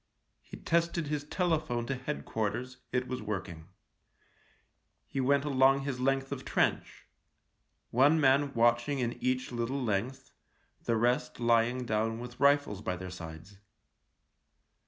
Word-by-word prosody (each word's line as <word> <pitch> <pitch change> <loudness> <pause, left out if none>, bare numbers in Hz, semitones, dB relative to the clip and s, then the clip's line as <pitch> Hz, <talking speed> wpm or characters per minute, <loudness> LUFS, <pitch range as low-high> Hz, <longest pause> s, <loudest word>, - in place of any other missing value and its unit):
He - - -11
tested 170 -1 0
his 150 -1 -2
telephone 155 -8 -1
to 135 - -2
Head 135 +3 -5
quarters 120 +4 -3
— - - -45
it 125 0 -1
was 125 -1 -4
working. 90 -6 -5 1.4
He 135 - -3
went 140 +2 +2
along 135 -1 +4
his 135 -2 -4
length 135 +1 0
of - - -4
trench - - -1 0.4
— - - -47 0.3
one 145 +6 +4
man 140 0 +3
watching 120 +4 +2
in 120 -2 -1
each 130 0 -1
little 120 +3 -2
length, 125 +3 -2 0.5
the 115 - +1
rest 125 +2 0
lying 120 +1 +2
down 115 0 0
with 125 +1 -9
rifles 140 -7 +3
by 90 - -2
their 90 0 -7
sides. 85 +2 -10
125 Hz, 140 wpm, -30 LUFS, 115-140 Hz, 1.4 s, along